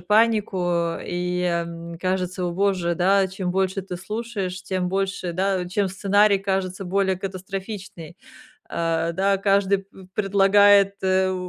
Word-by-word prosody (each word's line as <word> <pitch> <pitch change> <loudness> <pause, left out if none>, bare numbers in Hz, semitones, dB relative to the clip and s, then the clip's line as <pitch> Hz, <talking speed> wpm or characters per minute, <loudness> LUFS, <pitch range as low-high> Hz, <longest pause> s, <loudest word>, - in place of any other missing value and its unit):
панику, 185 -5 +1
и, 180 0 -2
м, 170 -1 -3
кажется, 185 0 -1
о 175 - -2
боже, 185 -2 0
да, 190 +3 +3
чем 185 -1 -4
больше 190 +1 0
ты 180 -2 -6
слушаешь, 195 -2 -4
тем 185 -1 -2
больше, 190 -2 -2
да, 185 0 0
чем 195 +1 0
сценарий 200 +1 +3
кажется 190 -1 -2
более 190 +1 +1
катастрофичный. 190 -2 -7 0.5
Э, 165 0 -1
да, 195 +3 +2
каждый 195 0 +2
п 190 -1 -15
предлагает, 200 0 +5
э, 190 0 +2
190 Hz, 130 wpm, -23 LUFS, 180-195 Hz, 0.5 s, предлагает